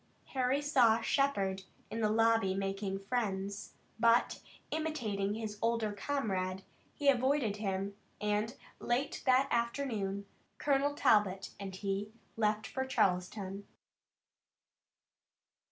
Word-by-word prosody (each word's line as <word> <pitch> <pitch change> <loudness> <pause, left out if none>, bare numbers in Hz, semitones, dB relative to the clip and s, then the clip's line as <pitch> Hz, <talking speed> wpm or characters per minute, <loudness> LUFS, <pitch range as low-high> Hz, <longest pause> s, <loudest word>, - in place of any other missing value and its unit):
Harry 265 +2 +1
saw 245 -6 +5
Shepard 200 -7 +1 0.3
in 225 +1 -2
the 215 - +3
lobby 225 -3 +3
making 195 0 -2
friends, 200 -2 -3 0.2
but, 235 +1 +4 0.3
imitating 220 -11 -1
his 215 -2 -5
older 230 -2 +1
comrade, 195 -6 -2 0.3
he 290 - -2
avoided 260 -4 +3
him, 195 -1 -2 0.2
and 210 +3 0 0.2
late 250 +4 -1
that 260 +1 +5
afternoon 235 -5 -1 0.3
Colonel 285 0 +1
Talbot 205 -7 +3
and 195 -2 -6
he 200 +2 -3 0.2
left 215 -1 +1
for 265 - -2
Charleston. 195 -3 0
215 Hz, 105 wpm, -33 LUFS, 195-255 Hz, 0.3 s, saw